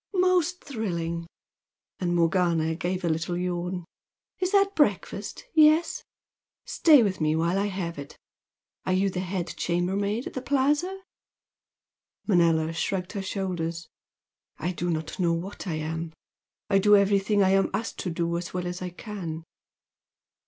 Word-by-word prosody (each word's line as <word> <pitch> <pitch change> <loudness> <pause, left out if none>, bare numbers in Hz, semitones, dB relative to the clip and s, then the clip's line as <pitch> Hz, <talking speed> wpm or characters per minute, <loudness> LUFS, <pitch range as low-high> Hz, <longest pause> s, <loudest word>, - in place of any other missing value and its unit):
"Most 360 -1 +2
thrilling!" 170 -9 -3 0.7
And 175 -1 0
Morgana 170 -1 +2
gave 180 +2 -2
a - - +1
little 165 +2 -1
yawn. 180 0 -3 0.5
"Is 365 0 0
that 395 -1 +4
breakfast? 205 - 0
Yes? 310 +1 +4 0.6
Stay 300 -7 +5
with 190 -5 -1
me 155 0 +2
while 170 +4 +1
I 200 - +1
have 175 -5 -4
it! 140 - -9 0.7
Are 185 - 0
you 195 +1 +2
the 180 - -3
head 185 -1 -3
chambermaid 195 +6 0
at - - -6
the 255 - -4
Plaza?" 290 +8 +1 1.2
Manella 165 -4 +3
shrugged 180 +2 -2
her 200 - -3
shoulders. 175 -4 -3 0.7
"I 175 - -2
do 175 0 -3
not 160 +1 -3
know 170 -2 +2
what 185 +4 -5
I 165 - -1
am! 160 +1 -4 0.5
I 195 -1 +4
do 210 +1 +6
everything 200 +1 +3
I 190 - +4
am 195 0 +3
asked 215 +4 -3
to 180 - -2
do 170 0 -1
as 175 +1 -7
well 180 -1 -2
as 180 +1 -4
I 180 - -3
can." 175 -4 -6
185 Hz, 150 wpm, -26 LUFS, 170-205 Hz, 1.2 s, do